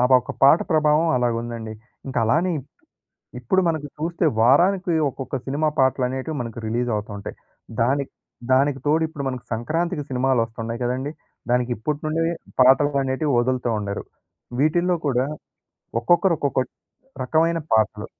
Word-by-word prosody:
ఆ! - - +3 0.2
ఒక 125 - -7
పాట 140 +5 +8
ప్రభావం 155 +1 +3
అలాగుందండి. 115 -2 -2 0.3
ఇంక 130 - -6
అలానే 170 +10 +2 0.9
ఇప్పుడు 190 +11 +2
మనకు 155 -3 -1
చూస్తే 170 +2 -2 0.2
వారానికి 175 - +4 0.2
ఒక్కొక్క 135 +1 -5
సినిమా 150 +3 0
పాటలనేటివి 130 +3 +1
మనకు 115 -1 -5
రిలీజ్ 120 +2 -1
అవుతా 105 0 -5
ఉంటాయి. 100 - -8 0.5
దాని 140 +4 +1 0.5
దానికి 135 +1 +3
తోడు 160 +2 +3
ఇప్పుడు 145 -3 -6
మనకు 130 -1 -5
సంక్రాంతికి 155 +7 -1
సినిమాలోస్తున్నాయి 115 -3 -1
కదండీ! 130 +4 -2 0.4
దానికి 125 0 +1
ఇప్పటి 145 +7 -3
నుండే 160 +2 0 0.4
పాటలనేటివి 135 +2 +3
వదులుతూ 125 0 0
ఉండారు. 100 -1 -4 0.6
వీటిల్లో 175 +4 +2
కూడా 130 -1 +1 0.7
ఒక్కొక్కరు 175 +7 +3
ఒక్కొక్క 140 -2 0 0.6
రకమైన 165 +5 +2
పాటలు. 110 -1 +2
135 Hz, 125 wpm, -23 LUFS, 120-155 Hz, 0.9 s, పాట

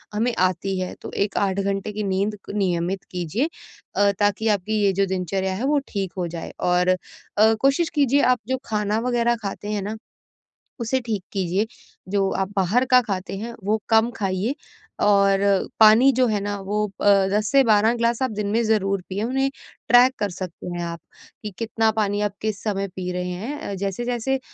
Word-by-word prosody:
हमें 235 +3 +1
आती 185 +1 0
है, 185 0 -3
तो - - -7
एक 200 0 -1
8 195 -1 +1
घंटे 200 +1 -2
की 210 +1 -3
नींद 200 +2 -1 0.2
नियमित 185 -1 -1
कीजिए 180 - -1 0.5
अ, 200 0 +4
ताकि 205 +2 +1
आपकी 210 +1 0
ये 200 - +4
जो 195 +1 +2
दिनचर्या 190 +1 -1
है, 230 +7 -2
वो 290 +1 +3
ठीक 195 -3 -3
हो 180 -2 -1
जाए। 165 0 -6
और 180 0 +2
अ, 210 +4 +1
कोशिश 275 +5 +3
कीजिए 285 -1 +3
आप - - -5
जो 260 - +1
खाना 210 0 0
वगैरह 240 -1 +2
खाते 205 +1 -5
हैं 210 -1 -1
ना, 210 +3 -4 0.8
उसे 235 +3 0
ठीक 215 -5 -2
कीजिए। 195 +2 0 0.4
जो 195 -1 +2
आप 190 0 -1
बाहर 200 +7 +2
का 255 0 +7
खाते 195 -4 -4
हैं, 230 +4 -6
वो 215 +2 0
कम 225 +1 +4
खाइए, 195 +6 -1 0.5
और 200 -1 +4 0.4
पानी 220 +5 +7
जो 255 +1 +3
है 215 -2 0
ना, 205 0 -3
वो 210 +2 -1 0.2
अ, 200 -1 +5
10 210 +1 +1
से 275 -1 +6
12 220 +1 +4
गिलास 235 +1 0
आप 260 - 0
दिन 210 -1 -3
में 230 +2 +2
ज़रूर 195 -3 +1
पीएँ। 200 +2 -2
उन्हें 270 +2 0 0.4
ट्रैक 245 +2 +6
कर 205 -1 0
सकते 180 -1 -7
हैं 175 - -3
आप 170 0 -5 0.4
कि 210 - -5
कितना 225 -1 +1
पानी 205 -2 0
आप 205 -1 -1
किस 215 -2 -2
समय 200 -2 -1
पी 180 -1 -3
रहे 180 0 -3
हैं। 220 +12 -5
अ, 200 - -5
जैसे-जैसे 240 +7 -2
205 Hz, 190 wpm, -23 LUFS, 190-225 Hz, 0.8 s, का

